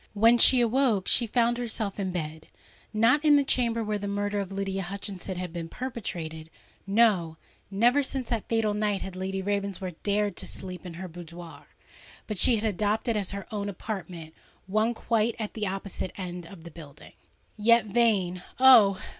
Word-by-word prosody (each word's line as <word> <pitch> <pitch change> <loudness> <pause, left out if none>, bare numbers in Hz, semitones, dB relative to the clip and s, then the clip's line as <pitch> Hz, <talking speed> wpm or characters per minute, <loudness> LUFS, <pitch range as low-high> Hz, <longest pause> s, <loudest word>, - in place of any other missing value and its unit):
When 230 +3 +5
she 255 +1 +7
awoke, 235 -4 +2
she 235 - +3
found 240 +1 +1
herself 220 -4 -3
in 190 -2 -1
bed,—not 185 - -2
in 300 -2 +6
the 285 - +4
chamber 235 -4 0
where 210 -1 -2
the 205 - -4
murder 205 0 -1
of 195 -1 -4
Lydia 195 0 -3
Hutchinson 195 0 -6
had 180 -2 -5
been 165 -1 -5
perpetrated: 165 -11 -6 0.4
no—never 205 - +1
since 265 -1 -2
that 230 -3 -2
fatal 225 -2 +1
night 210 -1 -1
had 190 -1 -7
Lady 190 +1 -3
Ravensworth 200 -3 -3
dared 205 0 0
to - - -6
sleep 185 -1 -7
in 170 - -8
her 185 +2 -6
boudoir;—but 175 +4 -11
she 245 - +6
had 215 - -3
adopted 215 +3 0
as 200 -3 -2
her 200 -1 -5
own 205 -1 -3
apartment, 180 -5 -7 0.3
one 215 +4 0
quite 230 0 0
at 215 -3 -5
the 215 -2 -3
opposite 190 -1 -4
end 180 -2 -6
of 170 -2 -13
the 170 - -10
building. 150 -3 -13 0.4
Yet, 230 +2 +4
vain—oh! 210 +1 +4
200 Hz, 165 wpm, -27 LUFS, 185-230 Hz, 0.4 s, she